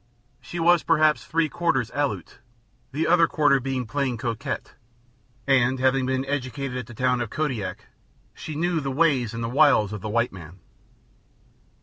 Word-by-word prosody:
She 125 +8 -7
was 170 0 +4
perhaps 155 -2 +3
three 165 0 +1
quarters 135 -7 -1
Aleut, 145 -1 -3 0.5
the 155 +4 -1
other 170 0 +4
quarter 145 -4 +3
being 130 -1 -3
plain 130 +1 -2
coquette, 115 0 -4 0.7
and, 130 -1 +3
having 130 0 +2
been 130 0 -1
educated 135 -1 -3
at 120 - -7
the 120 - -11
town 125 +1 +1
of 120 - -3
Kodiak, 130 -8 -3 0.5
she 155 - -7
knew 170 +2 0
the 140 -2 -3
ways 135 -5 +2
and 115 - -4
the - - -1
wiles 125 -5 +4
of 105 - -6
the 110 - -5
white 115 +1 0
man. 85 -1 -11
135 Hz, 160 wpm, -24 LUFS, 120-155 Hz, 0.7 s, was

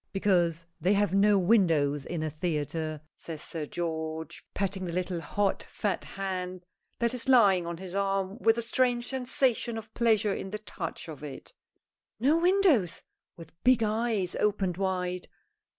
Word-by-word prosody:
"Because 175 -4 +2
they 185 +3 +3
have 205 -2 +2
no 200 +1 +5
windows 165 -8 +3
in 170 -2 -3
a 155 - -1
theatre," 155 -1 -2
says 160 -3 -7
Sir 155 -3 -4
George, 160 -1 -4
patting 195 -1 -1
the 175 - -3
little 180 0 -2
hot, 200 +5 0
fat 205 -3 -2
hand 185 -2 -4 0.3
that 235 0 +1
is 250 +1 -3
lying 195 -9 +5
on 170 0 -4
his 185 0 -8
arm, 195 +1 -1
with 225 -1 +4
a 235 - 0
strange 240 0 +1
sensation 250 -2 0
of 220 0 -9
pleasure 220 -3 +3
in 195 - -5
the 215 - -4
touch 185 -7 -6
of 155 -4 -8
it. 140 -3 -9 0.7
"No 295 +8 +3
windows?" 350 - +3 0.3
with 165 - -12
big 250 -2 +5
eyes 215 -3 0
opened 195 -4 0
wide. 180 -2 -2
190 Hz, 155 wpm, -29 LUFS, 170-220 Hz, 0.7 s, no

